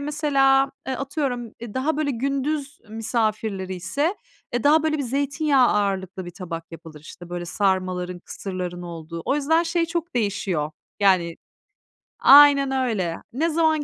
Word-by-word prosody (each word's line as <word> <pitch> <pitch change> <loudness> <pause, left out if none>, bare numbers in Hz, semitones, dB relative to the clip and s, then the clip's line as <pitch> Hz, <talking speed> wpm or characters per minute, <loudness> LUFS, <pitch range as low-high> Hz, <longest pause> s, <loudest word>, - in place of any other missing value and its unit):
mesela, 275 -2 +2 0.2
eee, 265 - -2
atıyorum, 265 -4 -3
eee, 235 -3 -8
daha, 285 +4 0
böyle, 300 -2 0
gündüz 275 +3 -2
misafirleri 215 -3 -2
ise, 280 - -1 0.4
eee, 240 -1 -1
daha 305 +2 +5
böyle 310 -1 0
bir - - -1
zeytinyağı 275 +1 +2
ağırlıklı 190 -2 -1
bir 175 - -7
tabak 170 -2 -8
yapılır, 160 -2 -11
işte, 175 +3 -12
böyle, 175 0 -4
sarmaların, 185 -1 -1
kısırların 180 -1 -6
olduğu. 165 -1 -7
O 275 - +1
yüzden 320 +3 +2
şey 335 0 0
çok 340 -1 -4
değişiyor 195 -9 -1 0.3
yani 185 -4 +3 0.9
Aynen 280 -1 +8
öyle. 220 -11 -1 0.2
Ne 315 +7 +1
zaman 315 -1 +2
240 Hz, 145 wpm, -23 LUFS, 185-285 Hz, 0.9 s, Aynen